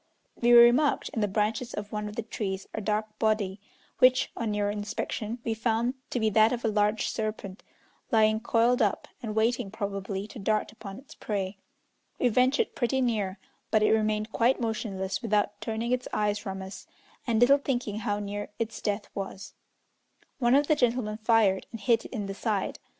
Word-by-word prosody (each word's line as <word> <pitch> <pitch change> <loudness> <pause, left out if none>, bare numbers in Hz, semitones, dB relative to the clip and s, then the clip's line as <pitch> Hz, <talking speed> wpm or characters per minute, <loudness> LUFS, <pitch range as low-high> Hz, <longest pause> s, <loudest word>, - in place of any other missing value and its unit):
We 240 0 +2
remarked 240 +5 +6
in 225 - -3
the 210 - +2
branches 215 +4 -1
of 205 0 -6
one 210 0 -3
of 210 - -10
the 230 - -3
trees 195 -3 -4
a 220 - -3
dark 215 +1 -2
body, 215 -3 0 0.4
which, 255 0 +5
on 230 -2 -2
nearer 205 -1 0
inspection, 210 +2 -4
we 225 - -1
found 230 +2 0 0.2
to 245 - -1
be 220 -1 +1
that 220 +2 +5
of 240 -2 -2
a - - +3
large 210 +1 +1
serpent, 215 -3 -4 0.5
lying 220 -1 +4
coiled 235 +2 +2
up, 205 -3 0
and 215 -3 -4
waiting, 230 0 +1
probably, 200 -2 -4
to 225 - -9
dart 215 +1 0
upon 200 -3 -9
its 275 - -13
prey. 195 -2 -4 0.6
We 250 - +2
ventured 255 +4 +2
pretty 265 +2 0
near, 215 -6 0 0.3
but 215 -1 +3
it - - +4
remained 215 0 +1
quite 240 +4 +2
motionless 195 -4 -2
without 210 -2 0
turning 225 +2 -2
its 250 0 0
eyes 210 -1 0
from 195 -2 -5
us, 190 +1 -9 0.4
and 225 -2 +2
little 275 +4 +6
thinking 245 -7 -2
how 205 -2 -1
near 205 0 -4
its 225 -1 -4
death 205 -1 -2
was. 195 0 -6 0.9
One 240 0 +4
of 290 +1 +4
the 305 - +3
gentlemen 240 -5 0
fired, 215 -4 +2
and 225 - -7
hit 230 0 +2
it - - -9
in 215 -6 -3
the 195 - -4
side. 205 -1 -2
215 Hz, 185 wpm, -28 LUFS, 205-235 Hz, 0.9 s, remarked